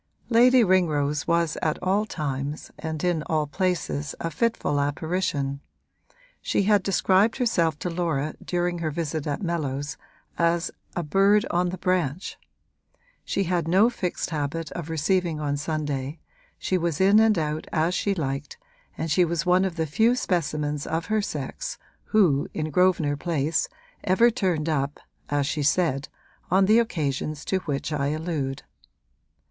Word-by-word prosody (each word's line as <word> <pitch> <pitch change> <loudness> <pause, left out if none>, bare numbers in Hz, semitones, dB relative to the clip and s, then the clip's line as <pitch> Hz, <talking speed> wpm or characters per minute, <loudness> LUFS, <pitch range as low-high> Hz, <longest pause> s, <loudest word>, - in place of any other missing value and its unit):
Lady 245 +1 +6
Ringrose 150 -7 +1
was 170 -2 +1
at 155 -1 0
all 200 +3 +1
times 140 -2 -4
and 160 -2 -4
in 175 -3 +1
all 155 -2 +1
places 155 -3 -2
a 165 - -3
fitful 160 -5 0
apparition; 145 -2 -1 0.8
she - - +1
had 205 0 +4
described 195 +3 +2
herself 170 - +1
to 180 - -4
Laura 165 -4 -1
during 175 -1 -1
her 160 -2 -1
visit 155 -1 -3
at 145 +5 -2
Mellows 145 -5 -2 0.4
as 170 +1 +2 0.2
'a 175 - -1
bird 195 +6 +3
on 175 +1 +1
the 185 - -5
branch.' 180 -2 -1 0.8
She 195 - -1
had 175 -3 -1
no 195 +8 +4
fixed 180 -8 -3
habit 155 +1 -3
of 170 -2 -6
receiving 165 +1 0
on 145 -1 -1
Sunday, 145 -1 -3 0.4
she 185 - 0
was 170 -3 -1
in 200 +3 +6
and 220 -2 +4
out 155 0 -2
as 165 +3 +1
she 200 +1 0
liked, 140 - -3 0.4
and 160 0 -3
she 180 - +4
was 170 -1 -1
one 180 +1 +4
of 190 -3 -2
the 160 -1 0
few 225 - +3
specimens 150 - -1
of 165 +1 -2
her 215 - +3
sex - - -5 0.3
who, 175 -11 +3
in 155 0 -2
Grosvenor 170 -4 +2
Place, 155 -1 0 0.3
ever 230 +6 +4
turned 180 -9 0
up, 145 -2 -1 0.3
as 145 -1 +1
she 150 +1 -1
said, 140 -2 +1 0.4
on 190 +2 +4
the 215 +4 +5
occasions 155 - -2
to 190 - 0
which 150 -2 -3
I 140 -1 0
allude. 150 -3 -3
165 Hz, 155 wpm, -25 LUFS, 150-185 Hz, 0.8 s, Lady